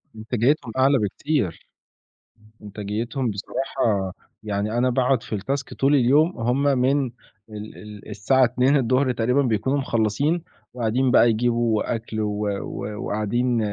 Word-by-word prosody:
إنتاجيتهم 115 Hz, +3 st, 0 dB
أعلى 135 Hz, +1 st, +4 dB
بكتير، 105 Hz, -, -2 dB, 1.0 s
إنتاجيتهم 110 Hz, +5 st, -3 dB
بصراحة 100 Hz, -2 st, -2 dB, 0.3 s
يعني 105 Hz, +2 st, -2 dB
أنا 125 Hz, +1 st, +2 dB
باقعد 125 Hz, -1 st, +1 dB
في 110 Hz, -, -4 dB
التاسك 135 Hz, +7 st, -3 dB
طول 140 Hz, +2 st, +2 dB
اليوم، 145 Hz, +7 st, +3 dB
هم 125 Hz, +4 st, 0 dB
من 135 Hz, 0 st, +2 dB, 0.4 s
ال 105 Hz, 0 st, -9 dB
ال 105 Hz, 0 st, -11 dB
الساعة 110 Hz, +6 st, +2 dB
14:00 130 Hz, +1 st, +2 dB
تقريبًا 125 Hz, +4 st, +1 dB
بيكونوا 130 Hz, +3 st, 0 dB
مخلّصين 135 Hz, +7 st, 0 dB, 0.3 s
وقاعدين 125 Hz, +2 st, 0 dB
بقى 120 Hz, -, +6 dB
يجيبوا 115 Hz, 0 st, +1 dB
أكل 110 Hz, -1 st, -5 dB
و 105 Hz, 0 st, -2 dB, 0.2 s
و 100 Hz, -, -6 dB, 0.2 s
وقاعدين 120 Hz, +4 st, 0 dB
120 Hz, 120 wpm, -23 LUFS, 105-135 Hz, 1.0 s, بقى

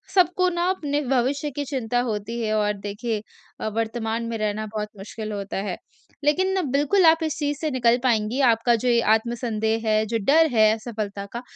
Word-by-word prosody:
सबको 365 Hz, 0 st, +4 dB
ना 345 Hz, -1 st, -1 dB
अपने 295 Hz, -6 st, -1 dB
भविष्य 270 Hz, +3 st, 0 dB
की 290 Hz, -, -2 dB
चिंता 245 Hz, -3 st, -1 dB
होती 230 Hz, 0 st, -3 dB
है 215 Hz, -1 st, -1 dB
और 210 Hz, -1 st, +1 dB
देखिए 210 Hz, +1 st, -3 dB, 0.4 s
अ, -, -, -2 dB
वर्तमान 225 Hz, 0 st, -2 dB
में 225 Hz, -, -3 dB
रहना 215 Hz, 0 st, -2 dB
बहुत 210 Hz, 0 st, -2 dB
मुश्क़िल 215 Hz, +2 st, -7 dB
होता 200 Hz, -1 st, -4 dB
है। 180 Hz, -, -4 dB, 0.5 s
लेकिन 375 Hz, +6 st, +2 dB
बिल्कुल 295 Hz, +7 st, +3 dB
आप 320 Hz, 0 st, +7 dB
इस 315 Hz, -, -2 dB
चीज़ 290 Hz, -1 st, -1 dB
से 315 Hz, -, -1 dB
निकल 240 Hz, -2 st, +3 dB
पाएँगी, 230 Hz, 0 st, +1 dB
आपका 235 Hz, -1 st, +3 dB
जो 240 Hz, +2 st, -2 dB
ये 235 Hz, -1 st, +4 dB
आत्मसंदेह 225 Hz, -1 st, 0 dB
है, 215 Hz, 0 st, +2 dB
जो 230 Hz, +1 st, -1 dB
डर 320 Hz, +7 st, +5 dB
है 215 Hz, -1 st, +5 dB
असफलता 215 Hz, -3 st, -5 dB
का, 235 Hz, -, -4 dB
235 Hz, 185 wpm, -24 LUFS, 215-285 Hz, 0.5 s, आप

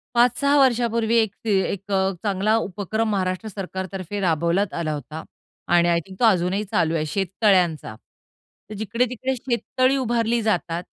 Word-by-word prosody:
5-6 250 Hz, +4 st, +3 dB
वर्षांपूर्वी 235 Hz, -3 st, +2 dB
एक 210 Hz, -3 st, -5 dB
ते 225 Hz, -, -3 dB, 0.2 s
एक 200 Hz, +1 st, -7 dB
अ, 190 Hz, 0 st, +1 dB
चांगला 205 Hz, +1 st, +1 dB
उपक्रम 215 Hz, +2 st, -2 dB
महाराष्ट्र 185 Hz, +1 st, -1 dB
सरकारतर्फे 190 Hz, -1 st, -5 dB
राबवण्यात 170 Hz, +3 st, +1 dB
आला 160 Hz, -2 st, -2 dB
होता 150 Hz, +2 st, -7 dB, 0.5 s
आणि 170 Hz, 0 st, +4 dB
आय 170 Hz, 0 st, +3 dB
थिंक 190 Hz, -1 st, -13 dB
तो 240 Hz, -, +4 dB
अजूनही 190 Hz, -1 st, +2 dB
चालू 165 Hz, 0 st, +1 dB
आहे 155 Hz, -1 st, -1 dB
शेततळ्यांचा. 185 Hz, -, +1 dB, 0.7 s
तर -, -, -7 dB
जिकडे-तिकडे 245 Hz, +4 st, -1 dB
शेततळी 255 Hz, +2 st, 0 dB
उभारली 235 Hz, -2 st, 0 dB
जातात 175 Hz, -5 st, -1 dB
200 Hz, 140 wpm, -23 LUFS, 180-230 Hz, 0.7 s, आणि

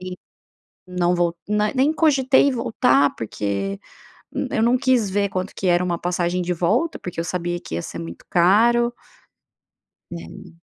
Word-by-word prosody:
e 185 Hz, -, -7 dB, 0.8 s
não 180 Hz, -1 st, 0 dB
vou 175 Hz, -1 st, 0 dB
ne 210 Hz, +3 st, 0 dB
nem 275 Hz, +4 st, +3 dB
cogitei 275 Hz, -4 st, +3 dB
em -, -, +2 dB
voltar, 230 Hz, -, +2 dB
porque 100 Hz, -2 st, -3 dB, 0.7 s
eu 220 Hz, -, 0 dB
não 240 Hz, +2 st, +4 dB
quis 255 Hz, -4 st, +2 dB
ver 200 Hz, +1 st, 0 dB
quanto 185 Hz, +1 st, -4 dB
que 190 Hz, -, -4 dB
era 175 Hz, 0 st, +3 dB
uma 175 Hz, -2 st, -1 dB
passagem 175 Hz, 0 st, -1 dB
de 180 Hz, +1 st, -1 dB
volta, 215 Hz, -, 0 dB
porque 180 Hz, -2 st, -8 dB
eu 165 Hz, -, -1 dB
sabia 175 Hz, -1 st, -3 dB
que 80 Hz, -, -8 dB
ia 85 Hz, -, -1 dB
ser 85 Hz, -, -7 dB
muito 85 Hz, 0 st, -9 dB
caro. 235 Hz, +7 st, +3 dB, 1.2 s
Né. 175 Hz, +1 st, -10 dB
180 Hz, 165 wpm, -22 LUFS, 170-235 Hz, 1.2 s, não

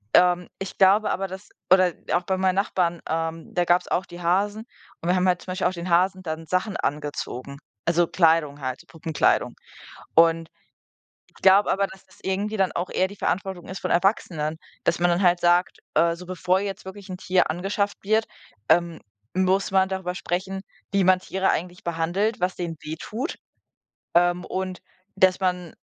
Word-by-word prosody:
ähm, 180 Hz, 0 st, +4 dB
ich 195 Hz, -, -6 dB
glaube 200 Hz, +2 st, +5 dB
aber, 195 Hz, +1 st, -1 dB
dass 190 Hz, +2 st, -9 dB, 0.2 s
oder 185 Hz, -2 st, +6 dB, 0.2 s
auch 180 Hz, -, +2 dB
bei 190 Hz, +1 st, -1 dB
meinen 185 Hz, 0 st, +2 dB
Nachbarn, 180 Hz, -3 st, 0 dB
ähm, 165 Hz, 0 st, -3 dB
da 175 Hz, -, +2 dB
gab 175 Hz, +1 st, +4 dB
es -, -, -16 dB
auch 185 Hz, -, 0 dB
die 175 Hz, -, -10 dB
Hasen 205 Hz, +5 st, 0 dB, 0.3 s
und 170 Hz, -, -3 dB
wir 180 Hz, -, +4 dB
haben 185 Hz, 0 st, +2 dB
halt 180 Hz, -1 st, +2 dB
zum 185 Hz, -, -6 dB
Beispiel 185 Hz, -, +1 dB
auch -, -, 0 dB
den 175 Hz, 0 st, -5 dB
Hasen 185 Hz, +2 st, +3 dB
dann 160 Hz, -1 st, -5 dB
Sachen 185 Hz, +4 st, 0 dB
angezogen, 140 Hz, -2 st, -4 dB, 0.3 s
also, 170 Hz, +1 st, +3 dB
Kleidung 160 Hz, -5 st, +2 dB
halt, 130 Hz, -1 st, -4 dB
Puppenkleidung. 160 Hz, -2 st, 0 dB, 0.6 s
Und 165 Hz, 0 st, +4 dB, 0.8 s
ich -, -, -31 dB
glaube 195 Hz, +2 st, +6 dB
aber, 200 Hz, +1 st, +1 dB
dass 190 Hz, 0 st, -14 dB
es 190 Hz, -, -22 dB
irgendwie 200 Hz, +3 st, -1 dB
dann 190 Hz, -2 st, +2 dB
auch 175 Hz, +2 st, -3 dB
eher 185 Hz, -, +1 dB
die 200 Hz, -, -11 dB
Verantwortung 190 Hz, -1 st, -2 dB
ist 190 Hz, -1 st, -6 dB
von -, -, -3 dB
Erwachsenen, 170 Hz, -5 st, +1 dB, 0.3 s
dass -, -, +2 dB
man 175 Hz, 0 st, +3 dB
dann 175 Hz, +3 st, +1 dB
halt 175 Hz, -1 st, +4 dB
sagt: 175 Hz, +1 st, +3 dB, 0.2 s
„Äh, 170 Hz, 0 st, +3 dB
so 180 Hz, +1 st, -11 dB
bevor 185 Hz, +1 st, +1 dB
jetzt 200 Hz, -1 st, -5 dB
wirklich 190 Hz, +1 st, -10 dB
'n 185 Hz, -, -5 dB
Tier 185 Hz, 0 st, +1 dB
angeschafft 200 Hz, +4 st, -1 dB
wird, 220 Hz, +2 st, +2 dB, 0.4 s
ähm, 170 Hz, 0 st, +2 dB, 0.3 s
muss 190 Hz, +1 st, +2 dB
man 190 Hz, 0 st, +3 dB
darüber 190 Hz, -2 st, -3 dB
sprechen, 190 Hz, +2 st, -3 dB, 0.3 s
wie 200 Hz, -1 st, +3 dB
man 185 Hz, 0 st, +5 dB
Tiere 190 Hz, +1 st, 0 dB
eigentlich 180 Hz, +2 st, -3 dB
behandelt, 175 Hz, +6 st, -1 dB
was 180 Hz, +1 st, 0 dB
denen 170 Hz, -2 st, -4 dB
wehtut, 210 Hz, -, -5 dB, 0.8 s
ähm, 175 Hz, +1 st, +3 dB
und 185 Hz, -1 st, -4 dB, 0.4 s
dass 190 Hz, -1 st, +4 dB
man" 180 Hz, -3 st, -1 dB
180 Hz, 185 wpm, -24 LUFS, 170-190 Hz, 0.8 s, oder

